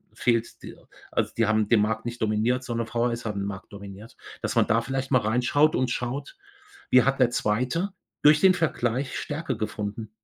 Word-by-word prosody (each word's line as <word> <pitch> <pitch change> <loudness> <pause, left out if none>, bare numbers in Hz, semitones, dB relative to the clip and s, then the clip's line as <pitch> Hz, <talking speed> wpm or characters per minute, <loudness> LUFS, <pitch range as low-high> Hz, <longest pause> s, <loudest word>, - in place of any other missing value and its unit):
fehlt 115 -2 -1
d - - -9 0.4
also, - - 0
die 115 - +3
haben 110 -1 +2
den 110 -3 +5
Markt 110 +1 -1
nicht 120 0 -6
dominiert, 110 +4 +1
sondern 115 -2 -3
VHS 115 +1 -1
haben 105 -2 -3
den 100 - -2
Markt 95 0 -8
dominiert, 100 +2 -11 0.2
dass - - -2
man - - +4
da 115 +2 +3
vielleicht 135 +2 -3
mal 125 -3 +4
reinschaut 125 +8 +2
und 130 -1 0
schaut, 135 - -4 0.5
wie 125 -2 +6
hat 135 +1 +1
der 125 -2 +5
2. 125 - 0 0.3
durch 150 +1 +7
den 190 -1 +6
Vergleich 130 -5 -1
Stärke 150 -2 -3
gefunden? 105 0 -4
120 Hz, 190 wpm, -26 LUFS, 110-130 Hz, 0.5 s, durch